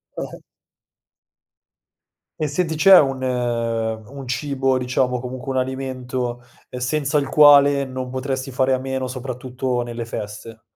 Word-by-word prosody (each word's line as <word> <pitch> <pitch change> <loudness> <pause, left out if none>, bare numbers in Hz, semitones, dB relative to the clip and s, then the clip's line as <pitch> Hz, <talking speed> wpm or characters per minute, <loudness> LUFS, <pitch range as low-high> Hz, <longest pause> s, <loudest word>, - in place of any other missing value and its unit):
Ah-ah. - - -6 2.0
E 155 - 0
senti, 160 +2 -1
c'è 190 +4 +8
un 135 -2 0
un 115 0 -2
cibo 135 0 0
diciamo, 125 0 0
comunque 130 +1 -6
un 130 - -1
alimento, 130 -2 -3 0.3
ehm, 125 - -6
senza 145 +3 0
il 140 -2 0
quale 145 -1 +6
non 130 -1 -5
potresti 130 0 -3
fare 130 +1 +1
a - - +2
meno, 130 0 -3
soprattutto 125 0 -3
nelle 120 -1 -5
feste? 110 0 -7
130 Hz, 130 wpm, -21 LUFS, 125-135 Hz, 2.0 s, c'è